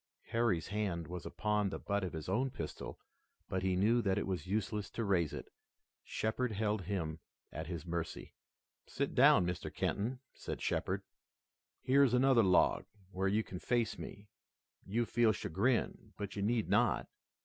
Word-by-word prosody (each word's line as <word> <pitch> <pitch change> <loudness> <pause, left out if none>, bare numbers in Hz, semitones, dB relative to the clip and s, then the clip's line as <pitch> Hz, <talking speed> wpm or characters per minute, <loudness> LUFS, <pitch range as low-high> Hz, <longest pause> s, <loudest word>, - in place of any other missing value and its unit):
Harry's 115 -8 +1
hand 100 -5 -1
was 90 0 -6
upon 105 +2 0
the - - -4
butt 100 -1 -1
of 90 - -3
his 80 -2 -5
own 120 +8 +1
pistol, 80 -10 -6 0.5
but 95 - -1
he 95 -1 +1
knew 110 +6 +4
that 95 -3 +1
it - - 0
was 95 -1 -3
useless 105 0 -1
to 115 - -3
raise 90 -7 +2
it. - - -7 0.5
Shepard 110 +2 -1
held 105 0 0
him 80 -5 -2 0.3
at 80 - -5
his 85 -3 -5
mercy. 85 -1 -4 0.5
"Sit - - -2
down, 90 - +6
Mr. 90 0 -3
Kenton," 120 +5 -1
said - - -5
Shepard. - - -1 0.8
"Here's 135 -1 +5
another 130 -1 +5
log, 95 -4 +4 0.3
where 95 +1 0
you 105 +3 +2
can 90 - -7
face 120 0 0
me. 100 +1 -8 0.6
You 115 +5 +1
feel 115 -1 +3
chagrin, 110 +7 0
but 100 -1 -5
you 100 - -2
need 110 +1 +1
not. - - +2
100 Hz, 160 wpm, -35 LUFS, 90-115 Hz, 0.8 s, down